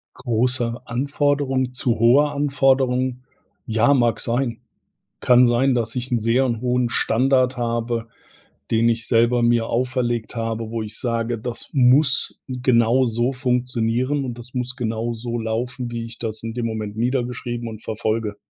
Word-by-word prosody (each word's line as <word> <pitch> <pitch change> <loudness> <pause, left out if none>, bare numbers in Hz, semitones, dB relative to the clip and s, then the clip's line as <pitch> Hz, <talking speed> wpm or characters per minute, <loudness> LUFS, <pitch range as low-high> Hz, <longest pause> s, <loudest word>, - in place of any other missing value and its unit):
Große 120 0 0
Anforderung, 135 0 0
zu 125 -1 0
hohe 125 +6 +5
Anforderung? 135 -3 +1 0.5
Ja, 115 +5 +3
mag 120 -3 +2
sein. 120 0 -1 0.6
Kann 125 0 +5
sein, 125 +2 +2
dass 115 -1 -2
ich 125 +1 -4
'n 120 - +2
sehr 115 +4 +2
'n 115 -3 -2
hohen 125 -1 0
Standard 130 +2 +2
habe, 115 -1 -2 0.6
den 115 +1 +3
ich 115 -1 0
selber 120 +1 +3
mir 120 -1 +2
auferlegt 120 -2 -1
habe, 115 -1 -3
wo 115 0 -3
ich 105 0 -5
sage: 115 -1 -1
„Das 115 +1 -4
muss 135 +1 +3
genau 125 -1 +2
so 120 +2 0
funktionieren 125 +1 -1
und 120 -2 -5
das 120 +2 -10
muss 125 0 -3
genau 115 -1 -2
so 120 +1 -4
laufen, 120 +2 -3
wie 115 -1 -4
ich 115 - -9
das 110 -1 -4
in 115 0 -4
dem 120 -1 -2
Moment 110 -2 -4
niedergeschrieben 120 -1 -2
und 110 -1 -9
verfolge.“ 110 -1 -2
120 Hz, 150 wpm, -22 LUFS, 115-125 Hz, 0.6 s, hohe